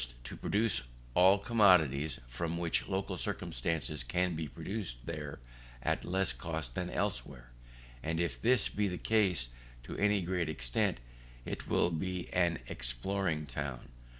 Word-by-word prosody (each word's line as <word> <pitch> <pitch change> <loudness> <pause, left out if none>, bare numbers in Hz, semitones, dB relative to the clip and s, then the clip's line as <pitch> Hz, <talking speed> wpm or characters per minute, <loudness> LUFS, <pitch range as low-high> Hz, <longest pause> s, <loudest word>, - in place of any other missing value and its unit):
To - - -6
produce 110 0 +2 0.3
all 95 +6 +7
commodities 90 - +4 0.4
which 85 -1 +1
from - - -12
local 95 +1 -1
circumstances 75 +4 -1
can 90 +8 0
be 80 -1 -3
produced 80 - -5
there 75 -3 -5 0.4
at - - +1
less 95 -5 +3
cost 80 -1 -4
than 90 +4 -2
elsewhere: 70 -13 -3 0.5
and 80 +1 -1
if 85 0 -1
this 120 -1 +4
be 105 0 0
the 90 -2 -3
case 95 - +2 0.3
to - - -7
any 105 -2 +3
great 85 -2 0
extent, 65 -7 0 0.5
it - - -5
will 90 - +3
be 90 +2 -3
an 85 -2 +3
exporting 75 +6 -1
town. 65 -2 -5
85 Hz, 140 wpm, -33 LUFS, 70-95 Hz, 0.5 s, all